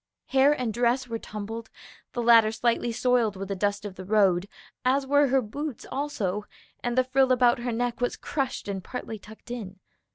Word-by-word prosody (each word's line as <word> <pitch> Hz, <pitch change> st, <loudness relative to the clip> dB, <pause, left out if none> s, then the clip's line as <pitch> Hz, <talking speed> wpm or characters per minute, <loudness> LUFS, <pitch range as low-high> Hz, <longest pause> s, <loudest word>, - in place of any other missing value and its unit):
Hair 270 Hz, +2 st, +5 dB
and 235 Hz, -4 st, -1 dB
dress 245 Hz, +2 st, +1 dB
were 230 Hz, -1 st, -4 dB
tumbled, 220 Hz, +2 st, -6 dB, 0.4 s
the 240 Hz, -, -2 dB
latter 230 Hz, -2 st, +6 dB
slightly 235 Hz, +1 st, 0 dB
soiled 235 Hz, -3 st, +2 dB
with 195 Hz, +1 st, -6 dB
the 195 Hz, -, -1 dB
dust 205 Hz, +2 st, -1 dB
of 205 Hz, -, -5 dB
the 185 Hz, -, -6 dB
road, 195 Hz, -2 st, +3 dB, 0.4 s
as 270 Hz, +2 st, +2 dB
were 285 Hz, +1 st, +4 dB
her 265 Hz, 0 st, +2 dB
boots 285 Hz, +5 st, -5 dB
also, 210 Hz, -8 st, -2 dB, 0.4 s
and 240 Hz, 0 st, -1 dB
the 255 Hz, -, +5 dB
frill 260 Hz, 0 st, +2 dB
about 245 Hz, -1 st, +4 dB
her 240 Hz, 0 st, -2 dB
neck 245 Hz, +1 st, -2 dB
was 245 Hz, -, 0 dB
crushed 270 Hz, -7 st, -3 dB
and 195 Hz, -2 st, -4 dB
partly 225 Hz, -2 st, -6 dB
tucked 220 Hz, +3 st, -13 dB
in. 200 Hz, -6 st, -6 dB
235 Hz, 190 wpm, -27 LUFS, 210-255 Hz, 0.4 s, latter